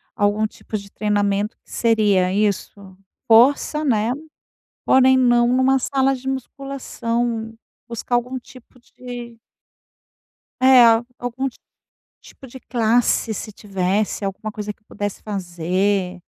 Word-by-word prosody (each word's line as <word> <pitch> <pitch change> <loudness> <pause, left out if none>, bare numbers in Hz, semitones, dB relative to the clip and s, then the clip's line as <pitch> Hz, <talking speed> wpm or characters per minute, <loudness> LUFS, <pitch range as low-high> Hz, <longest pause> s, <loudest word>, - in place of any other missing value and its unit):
algum 205 +1 +1
tipo 215 0 -7
de 200 -1 -11
treinamento, 205 0 0
que - - -27
seria 205 -5 +2
isso 200 -2 -2 0.3
força, 275 +6 +4
né, 225 -2 +1 0.7
porém, 260 0 +5
não 240 -2 +4
numa 260 +1 +3
sala 270 +1 +1
de 265 +1 -7
musculação. 240 -4 -3 0.3
Buscar 235 +1 -4
algum 250 +2 -2
tipo 250 0 -17
de 240 -2 -10 1.2
é, 260 -1 +7
al 230 +1 +4
algum 250 +2 -2 0.7
tipo 265 - -14
de 260 +1 -12
classe, 230 -1 +1
se 215 - -6
tivesse 200 +1 -2
alguma 200 +2 -4
coisa 210 -1 -5
que 215 - -41
pudesse 205 -1 -5
fazer. 185 0 -1
225 Hz, 120 wpm, -21 LUFS, 205-250 Hz, 1.2 s, é